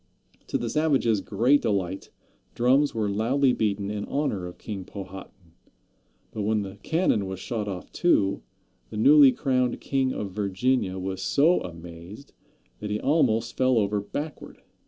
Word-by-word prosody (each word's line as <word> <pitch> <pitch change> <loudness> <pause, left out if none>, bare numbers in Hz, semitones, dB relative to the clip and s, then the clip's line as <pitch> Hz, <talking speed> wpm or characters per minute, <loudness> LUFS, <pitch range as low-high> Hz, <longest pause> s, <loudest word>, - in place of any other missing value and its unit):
To - - 0
the - - -4
savages' 135 -9 +1
great 115 +10 +2
delight, 95 -2 -2 0.5
drums 130 +4 +3
were 110 -2 0
loudly 125 +6 +2
beaten 100 -3 -1
in 105 -1 -4
honor 110 -11 -2
of 90 - -10
King 100 -3 -6
Powhatan, 95 -2 -10 0.8
but 110 - -5
when 105 0 0
the 95 -1 -8
cannon 160 - +1
was 95 -1 -6
shot 105 +1 -4
off, 95 -3 -6
too, 100 - +2 0.5
the - - -7
newly 140 +4 +7
crowned 125 -1 0
king 135 -1 0
of 100 -5 -4
Virginia 100 +1 0
was 95 0 -4
so 160 +5 +3
amazed 85 - -10 0.5
that 105 - -5
he 105 0 -1
almost 130 -6 +1
fell 130 -1 +2
over 105 -1 +1
backward. 145 +9 -7
105 Hz, 150 wpm, -26 LUFS, 95-130 Hz, 0.8 s, newly